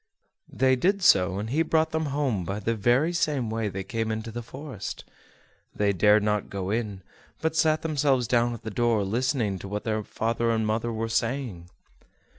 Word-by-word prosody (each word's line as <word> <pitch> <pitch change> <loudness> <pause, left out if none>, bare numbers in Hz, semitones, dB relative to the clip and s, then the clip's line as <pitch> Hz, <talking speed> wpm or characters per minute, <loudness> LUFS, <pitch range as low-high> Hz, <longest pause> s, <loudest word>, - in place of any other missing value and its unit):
They 130 0 +3
did 195 +9 +1
so, 95 - +5
and 105 +3 -4
he 155 +4 +2
brought 160 -1 +2
them 160 0 -1
home 135 -9 -1
by 95 +4 -3
the 115 +3 -1
very 120 +10 +2
same 140 -9 0
way 110 -1 -1
they 95 0 -5
came 115 +3 -2
into 110 +1 -4
the 120 +2 -5
forest. 130 -3 -7 0.7
They 100 -1 +2
dared 105 +3 +4
not 105 -1 0
go 95 -1 -3
in, 105 -4 -3 0.4
but 160 0 -1
sat 155 -1 +2
themselves 140 -6 +1
down 120 0 +2
at - - -12
the 110 - -5
door, 115 -1 +1
listening 115 -1 0
to 100 - -8
what 105 +1 -4
their 110 -1 -1
father 115 +2 -1
and 110 -1 +1
mother 110 +2 -1
were 115 0 -2
saying. 115 -6 -2
115 Hz, 190 wpm, -26 LUFS, 105-135 Hz, 0.7 s, so